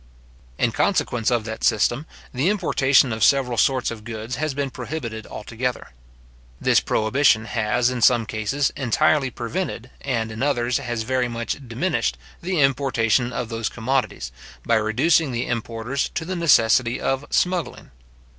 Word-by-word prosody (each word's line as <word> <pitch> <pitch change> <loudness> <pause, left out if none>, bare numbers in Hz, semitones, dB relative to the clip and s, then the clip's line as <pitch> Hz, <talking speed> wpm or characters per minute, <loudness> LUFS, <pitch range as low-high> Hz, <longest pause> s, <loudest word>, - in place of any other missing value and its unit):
In - - +1
consequence 115 -3 +1
of 120 -2 +1
that 110 -1 -6
system, 120 +7 +2 0.3
the 135 +8 +1
importation 140 - +3
of 110 -2 -1
several 130 -1 +3
sorts 130 +2 +2
of 110 -2 -8
goods 115 +1 -5
has 155 -1 -2
been 140 -1 -2
prohibited 120 -5 -6
altogether. 120 +4 -4 0.7
This - - +4
prohibition 110 0 +2
has, 120 +3 0
in 125 -1 -4
some 120 -1 +4
cases, 110 +7 -1
entirely 140 +2 +2
prevented, 130 -1 -4
and 115 -3 -2
in 110 +2 -7
others 125 -3 +1
has 120 -2 -3
very 125 +1 0
much 120 +3 -5
diminished, 130 +11 -1 0.2
the 180 -2 0
importation 125 -3 +2
of 120 -1 -4
those 115 -2 -2
commodities, 120 - -2 0.3
by - - +1
reducing 130 +8 +2
the 120 0 -2
importers 115 +3 -2
to 160 - -2
the 185 +2 -3
necessity 125 -7 +3
of 135 +1 -1
smuggling. 180 - -1
125 Hz, 145 wpm, -22 LUFS, 115-140 Hz, 0.7 s, This